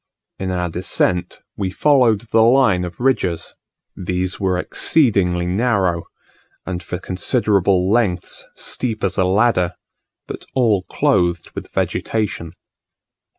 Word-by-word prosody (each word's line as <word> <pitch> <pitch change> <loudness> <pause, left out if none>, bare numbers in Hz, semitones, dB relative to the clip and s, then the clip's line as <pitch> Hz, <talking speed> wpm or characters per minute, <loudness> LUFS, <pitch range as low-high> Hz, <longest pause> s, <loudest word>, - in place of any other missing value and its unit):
In 95 - -3
our 90 -1 -1
descent 90 +1 -1
we 95 -2 -2
followed 120 -1 +3
the 110 - +4
line 115 -6 +4
of 85 -1 -9
ridges; 110 -10 0 0.4
these 90 0 -3
were 95 -2 0
exceedingly 90 - +2
narrow, 95 -3 0 0.6
and 90 -2 -4
for 90 +1 -5
considerable 95 -1 +1
lengths 100 -4 0
steep 115 -4 -1
as 95 0 0
a 95 - +3
ladder; 95 -2 +2 0.5
but - - -8
all 115 -7 +3
clothed 85 -1 +1
with - - -8
vegetation. 100 -7 -2
95 Hz, 115 wpm, -19 LUFS, 90-110 Hz, 0.6 s, the